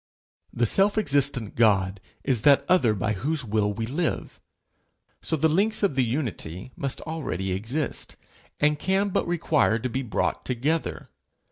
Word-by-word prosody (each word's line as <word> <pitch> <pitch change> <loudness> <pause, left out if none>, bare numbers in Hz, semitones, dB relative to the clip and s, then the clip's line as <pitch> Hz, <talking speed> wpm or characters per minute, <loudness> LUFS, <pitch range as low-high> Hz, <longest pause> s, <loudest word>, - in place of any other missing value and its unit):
The 120 - +1
self 195 - +3
existent 140 - +1
God 100 -4 +2 0.2
is 130 -5 0
that 140 +2 +5
other 130 -12 +4
by 110 +2 -1
whose 140 +7 -2
will 105 -1 +1
we 110 +2 -3
live; 155 +8 -2 0.8
so - - -1
the 160 +1 +3
links 205 +8 +1
of 200 - +3
the 130 -1 +2
unity 115 - -4
must 140 -1 -3
already 115 - -3
exist, 115 +11 -3 0.4
and 150 0 +2
can 195 +3 +1
but 185 - 0
require 155 -8 +2
to 125 +2 -3
be 130 - -1
brought 120 -6 -1
together. 140 +6 -2
135 Hz, 150 wpm, -25 LUFS, 110-160 Hz, 0.8 s, that